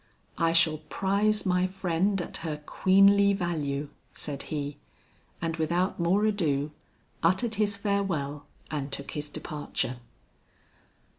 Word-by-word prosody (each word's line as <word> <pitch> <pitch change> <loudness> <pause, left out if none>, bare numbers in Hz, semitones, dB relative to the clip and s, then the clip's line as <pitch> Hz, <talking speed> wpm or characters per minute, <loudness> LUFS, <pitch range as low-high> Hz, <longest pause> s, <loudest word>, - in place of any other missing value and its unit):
"I 165 0 +3
shall 160 -2 +3
prize 200 +6 +1
my 180 0 +2
friend 190 +1 0
at - - -6
her 160 -2 -3
queenly 200 +3 +5
value," 150 -6 -2 0.2
said 140 -2 -4
he; 145 -2 -3 0.6
and 165 -1 -2
without 175 +5 0
more 185 +5 +3
ado, 155 -9 +1 0.5
uttered 190 +7 +2
his 205 -1 +1
farewell 170 -9 -1 0.2
and 140 -2 -3
took 140 +1 -4
his 150 0 -4
departure. 150 -5 -3
170 Hz, 120 wpm, -28 LUFS, 150-195 Hz, 0.6 s, queenly